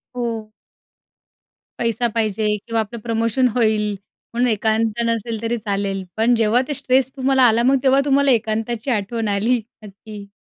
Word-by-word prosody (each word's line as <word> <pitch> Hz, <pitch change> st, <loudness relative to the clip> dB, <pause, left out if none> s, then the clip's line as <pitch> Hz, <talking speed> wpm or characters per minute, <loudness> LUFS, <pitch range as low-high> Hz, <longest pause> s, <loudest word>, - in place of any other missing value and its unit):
हो. 230 Hz, -3 st, -4 dB, 1.3 s
पैसा 235 Hz, +1 st, 0 dB
पाहिजे 215 Hz, -1 st, 0 dB
किंवा 230 Hz, +2 st, -3 dB
आपलं 220 Hz, +2 st, -4 dB
प्रमोशन 230 Hz, +2 st, +1 dB
होईल 215 Hz, -3 st, +2 dB, 0.4 s
म्हणून 245 Hz, +2 st, +1 dB
एकांत 220 Hz, +1 st, 0 dB
नसेल 230 Hz, -1 st, -2 dB
तरी 230 Hz, +1 st, -1 dB
चालेल. 200 Hz, -2 st, -2 dB
पण 230 Hz, +2 st, +3 dB
जेव्हा 225 Hz, +2 st, +3 dB
ते 295 Hz, -, -2 dB
स्ट्रेस 260 Hz, -1 st, +1 dB
तुम्हाला 265 Hz, 0 st, +3 dB
आला, 230 Hz, 0 st, +4 dB
मग 265 Hz, +2 st, +4 dB
तेव्हा 270 Hz, 0 st, +4 dB
तुम्हाला 280 Hz, -1 st, +3 dB
एकांताची 225 Hz, +2 st, -1 dB
आठवण 225 Hz, +1 st, -2 dB
आली 210 Hz, +5 st, +1 dB, 0.3 s
नक्की. 205 Hz, 0 st, -11 dB
230 Hz, 145 wpm, -20 LUFS, 215-245 Hz, 1.3 s, आला